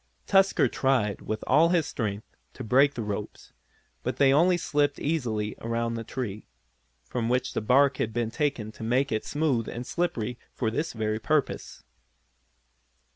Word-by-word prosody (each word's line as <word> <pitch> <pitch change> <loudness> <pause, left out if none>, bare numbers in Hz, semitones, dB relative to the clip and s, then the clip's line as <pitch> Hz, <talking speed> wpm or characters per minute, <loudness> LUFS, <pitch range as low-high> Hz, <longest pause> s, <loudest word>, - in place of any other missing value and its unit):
Tusker 195 0 +4
tried, 125 -7 0
with 110 0 -4
all 155 +6 +5
his 170 -3 +2
strength 105 -3 -4 0.2
to - - -7
break 135 +5 +4
the 115 - -3
ropes, 105 0 -6 0.5
but - - -3
they 135 -1 +5
only 175 +5 +4
slipped 145 -3 0
easily 115 -9 -1
around 115 0 -1
the 115 0 -4
tree, 110 -3 -5 0.6
from 120 -2 -2
which 125 +1 0
the - - -1
bark 130 +4 +4
had 115 - -1
been 115 0 -2
taken 135 -6 -1
to 115 - -15
make 130 +4 +1
it 110 -1 -1
smooth 145 -7 0
and 120 +1 -6
slippery 125 -9 -2 0.2
for 110 -4 -1
this 150 +7 -2
very 110 -1 -1
purpose. 150 +4 -1
125 Hz, 160 wpm, -27 LUFS, 110-145 Hz, 0.6 s, all